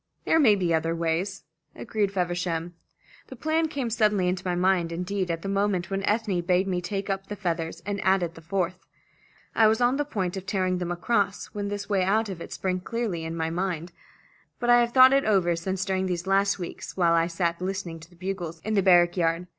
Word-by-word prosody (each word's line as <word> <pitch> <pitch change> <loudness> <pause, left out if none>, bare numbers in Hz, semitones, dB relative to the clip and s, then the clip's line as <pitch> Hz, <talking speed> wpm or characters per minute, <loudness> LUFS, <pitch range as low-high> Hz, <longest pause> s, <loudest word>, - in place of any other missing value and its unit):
There 325 - +3
may 230 -9 +6
be 180 -4 0
other 165 +1 0
ways," 165 +3 -2 0.3
agreed 205 -3 -1
Feversham. 175 -2 -2 0.5
"The 260 - -9
plan 315 +5 0
came 275 -6 -3
suddenly 210 -4 +2
into 180 0 -1
my 180 -1 -1
mind, 180 -2 +2
indeed 180 +2 -2
at 165 -1 -3
the - - -4
moment 195 -2 0
when 195 0 -1
Ethne 210 -4 0
bade 180 +2 +1
me 180 -2 -1
take 195 +2 -4
up 195 -1 -3
the 205 - -5
feathers, 170 -3 -3
and 200 0 -3
added 190 -3 +2
the 165 - -13
fourth. 180 +1 -3 0.7
I 220 - +5
was 220 +1 +2
on 245 +2 +3
the 290 - +1
point 190 -10 -3
of 190 0 -7
tearing 185 -2 0
them 175 -1 -3
across 200 +3 -1
when 205 -1 -3
this 205 0 -4
way 200 -2 +1
out 215 +3 +1
of 180 -3 -6
it - - -8
sprang 185 -1 -2
clearly 205 -4 -3
up - - -4
in 165 +1 -5
my 160 0 -1
mind. 175 -1 -3 0.7
But 240 0 +2
I 240 - +7
have 235 0 +1
thought 260 +1 +7
it 275 0 +4
over 185 -5 +2
since 190 +3 -3
during 190 -1 0
these 175 -1 -3
last 195 +1 +2
weeks 175 0 -7
while 170 -2 +3
I 165 0 +3
sat 170 0 -1
listening 185 -3 -4
to 160 +1 -14
the 175 - -20
bugles 175 -2 -5
in 215 - -3
the 200 - +3
barrack 175 -1 +5
yard. 165 0 +1
185 Hz, 225 wpm, -26 LUFS, 175-205 Hz, 0.7 s, I